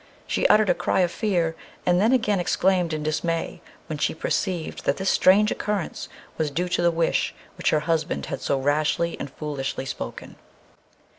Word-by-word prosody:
She - - +1
uttered 215 -3 +5
a - - +4
cry 175 +2 +1
of 175 -1 +2
fear, 175 -6 0 0.3
and 180 0 +3
then 220 +4 +4
again 215 -6 +2
exclaimed 180 -1 +1
in 155 -1 -3
dismay, 165 +2 -2 0.2
when 155 -2 -5
she - - 0
perceived 175 0 -2
that 140 - +1
this 190 0 +1
strange 205 +3 +5
occurrence 205 -5 -3 0.3
was 155 -2 +1
due 175 +5 -2
to 175 - 0
the 175 - +4
wish 165 -1 0 0.2
which - - 0
her 155 - +2
husband 155 - -1
had - - -5
so 140 - 0
rashly 155 +4 +1
and - - -5
foolishly 135 -2 -4
spoken. - - -7
170 Hz, 175 wpm, -24 LUFS, 155-185 Hz, 0.3 s, uttered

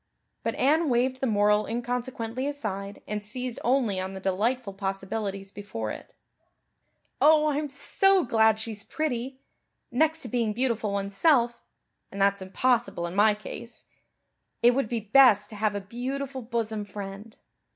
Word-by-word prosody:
But - - -2
Anne 305 +4 +3
waved 255 +1 +1
the 265 - +1
moral 210 -1 +3
inconsequently 245 +1 -3
aside 200 -8 -5
and 210 0 -3
seized 245 +3 -5
only 240 -6 +2
on 190 +1 -4
the 190 - -6
delightful 205 +4 -1
possibilities 195 0 -4
before 115 - -5
it. - - -10 1.1
"Oh, 305 +1 +6
I'm 295 0 -1
so 385 +7 +2
glad 220 -3 +3
she's 220 -2 -5
pretty. 265 -3 -3 0.5
Next 315 +6 +1
to - - -5
being 230 -2 0
beautiful 230 -3 0
oneself 235 +5 +2 0.5
and 200 - -7
that's 200 0 +3
impossible 230 -1 0
in 170 - -5
my 210 +2 +4
case 230 +2 -9 0.8
it 240 - +8
would 245 -3 -1
be 235 -2 -1
best 215 -1 +5
to - - -8
have 210 -1 0
a 205 - -2
beautiful 260 +6 -4
bosom 225 -2 -2
friend. 205 +2 -8
225 Hz, 145 wpm, -27 LUFS, 205-255 Hz, 1.1 s, it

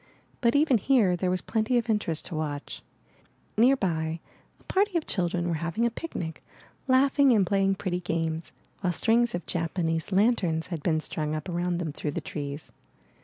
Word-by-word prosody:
But 235 0 +3
even 285 -5 +4
here 215 -6 +3
there 180 +1 -1
was 185 0 0
plenty 225 +2 +1
of 240 -1 0
interest 210 -8 +1
to 170 - -6
watch. 150 -2 -4 0.7
Nearby 175 -10 +2 0.4
a - - -24
party 390 -1 +1
of 320 - -2
children 175 -2 -1
were 170 - 0
having 170 +8 0
a 235 - +1
picnic, 180 - -6 0.4
laughing 270 +1 +4
and 205 -4 +4
playing 195 +1 +2
pretty 185 -2 -2
games, 165 -2 -2 0.3
while 180 -2 0
strings 230 +4 +2
of 175 - -5
Japanese 165 0 -1
lanterns 190 -6 +2
had 160 - -4
been 155 0 +1
strung 155 0 -3
up 155 +2 -5
around 175 0 -1
them 170 -3 -3
through 150 -1 -4
the - - +2
trees. 145 0 -6
180 Hz, 170 wpm, -27 LUFS, 165-230 Hz, 0.7 s, even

